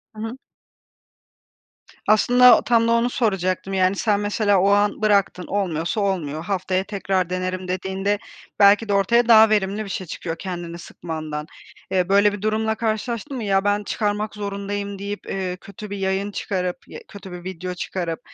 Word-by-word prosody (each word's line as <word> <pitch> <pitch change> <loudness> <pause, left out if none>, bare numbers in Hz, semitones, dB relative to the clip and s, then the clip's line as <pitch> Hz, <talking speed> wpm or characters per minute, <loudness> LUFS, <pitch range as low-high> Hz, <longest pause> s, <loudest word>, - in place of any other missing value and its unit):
Hı - - -10
hı. 225 +3 -5 1.7
Aslında 245 +3 +6
tam 230 -1 +2
da - - +2
onu 235 +1 +2
soracaktım: 195 -5 -1
Yani 185 0 +2
sen 205 0 +1
mesela 205 -1 +2
o 195 - +3
an 205 +1 +2
bıraktın, 200 -4 +2
olmuyorsa 180 -1 -1
olmuyor, 165 -6 -2
haftaya 185 -1 -1
tekrar 195 -3 -1
denerim, 185 0 -3
dediğinde 190 +2 -1 0.4
belki 205 +2 +5
de - - +2
ortaya 235 +5 +3
daha 220 -2 +8
verimli 205 0 +1
bir 205 - -8
şey 185 -1 -4
çıkıyor 165 +1 -5
kendini 175 -3 -6
sıkmandan. 155 -3 -6 0.4
Eee, 185 -1 +1
böyle 200 +1 +4
bir 205 - -6
durumla 220 +1 0
karşılaştın 235 +4 -3
mı? 235 - -4
"Ya, 195 -1 +2
ben 205 0 +1
çıkarmak 210 0 -2
zorundayım." 200 -1 -4
deyip, 205 +1 -5
eee, 185 -2 -3
kötü 210 +3 -10
bir 200 - -5
yayın 195 +1 -1
çıkarıp 180 -3 -2
ya - - -9
kötü 200 -2 -11
bir 175 0 -8
video 180 0 -5
çıkarıp 175 -2 -4
200 Hz, 165 wpm, -22 LUFS, 185-210 Hz, 1.7 s, daha